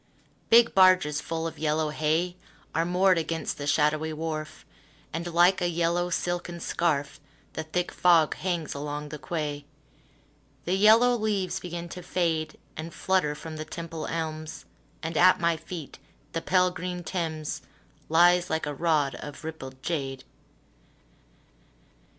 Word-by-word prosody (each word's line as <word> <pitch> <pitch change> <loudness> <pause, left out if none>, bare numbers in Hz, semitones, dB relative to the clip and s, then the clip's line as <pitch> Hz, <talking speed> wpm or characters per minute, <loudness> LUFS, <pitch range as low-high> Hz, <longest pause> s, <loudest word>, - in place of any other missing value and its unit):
Big 235 +1 +6
barges 185 -6 +5
full 165 0 -3
of 165 - -5
yellow 155 0 +1
hay 160 +4 0 0.4
Are 165 - +1
moored 180 0 +3
against 165 -1 -3
the 145 - -4
shadowy 155 +1 +2
wharf, 155 -1 -5 0.5
And, 170 +2 -3
like 175 +3 +4
a 175 - +1
yellow 170 +1 0
silken 175 0 -2
scarf, 150 -5 -1 0.3
The - - -3
thick 175 +3 -2
fog 170 -4 +4
hangs 175 -4 -2
along 150 +1 -5
the 150 - -7
quay. 150 -3 -3 1.0
The 180 - 0
yellow 220 +5 +6
leaves 210 -5 -1
begin 175 -1 -6
to 180 - -7
fade 160 -4 -1 0.2
And 160 +2 -6
flutter 185 -6 +1
from 155 +1 -8
the 155 - -4
Temple 165 0 -6
elms, 155 -1 -4 0.4
And 160 0 -3
at 185 +1 +6
my 170 -1 +2
feet 160 -3 -8 0.3
the 165 - -2
pale 180 0 +3
green 180 0 -5
Thames 160 -4 -3 0.5
Lies 175 +2 +5
like 160 0 -1
a 145 - -3
rod 150 -2 +1
of 145 +2 -9
rippled 130 -5 -8
jade. 135 -5 -3
165 Hz, 140 wpm, -27 LUFS, 155-175 Hz, 1.0 s, Big